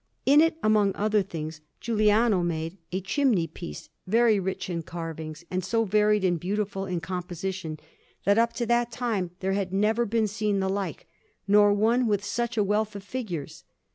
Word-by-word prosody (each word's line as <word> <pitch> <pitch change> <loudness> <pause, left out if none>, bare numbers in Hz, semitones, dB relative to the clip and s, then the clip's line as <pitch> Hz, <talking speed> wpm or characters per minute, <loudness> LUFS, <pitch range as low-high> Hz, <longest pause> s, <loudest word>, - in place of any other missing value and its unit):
In 290 +3 +7
it, 330 0 +2
among 210 -2 +3
other 210 0 +2
things, 160 -4 -6 0.2
Giuliano 215 -2 +3
made 165 0 -2 0.2
a 190 +2 -2
chimney 215 - +2
piece, 165 +2 -9 0.2
very 225 +1 +4
rich 190 0 -3
in 170 -2 -3
carvings, 160 -1 -7
and 185 0 -1
so 225 +5 +1
varied 210 0 +3
and 175 -2 +1
beautiful 195 +1 -2
in 180 -2 -2
composition, 180 -1 -4 0.5
that 200 +2 +4
up 235 0 +3
to 235 0 -2
that 240 0 +1
time 220 -6 -1
there 190 0 0
had 195 -2 -1
never 215 +4 +2
been 225 +1 +1
seen 210 -1 -1
the 190 0 0
like, 195 0 -3 0.4
nor 205 0 +6
one 230 +4 +2
with 205 -2 +1
such 235 +3 -2
a 210 - +4
wealth 210 +1 0
of 200 - -7
figures. 200 - -5
200 Hz, 175 wpm, -27 LUFS, 180-220 Hz, 0.5 s, In